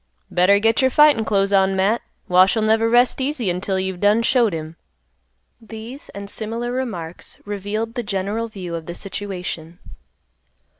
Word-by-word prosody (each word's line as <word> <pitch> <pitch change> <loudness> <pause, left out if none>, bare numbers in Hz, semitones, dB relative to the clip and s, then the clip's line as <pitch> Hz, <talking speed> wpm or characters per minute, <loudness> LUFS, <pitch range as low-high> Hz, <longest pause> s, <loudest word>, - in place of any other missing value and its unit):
"Better 185 +3 +4
get 225 +3 +2
your 260 - +4
fightin' 295 -3 +5
clothes 200 -2 +1
on, 195 0 +3
Matt; 200 +5 +1 0.3
Wash'll 185 +5 +4
never 220 +1 +3
rest 245 +3 +3
easy 260 - -1
until 190 +2 -2
you've 190 -1 -3
done 210 +3 +3
showed 235 -3 +3
him." 160 -1 -6 0.9
These 225 +5 -9
and 200 0 -8
similar 230 +4 -3
remarks 185 -10 -5
revealed 205 +3 -3
the 245 - -2
general 205 +2 -2
view 185 -6 -7
of 165 -1 -5
the 170 - -6
situation. 180 -4 -5
205 Hz, 150 wpm, -21 LUFS, 190-230 Hz, 0.9 s, fightin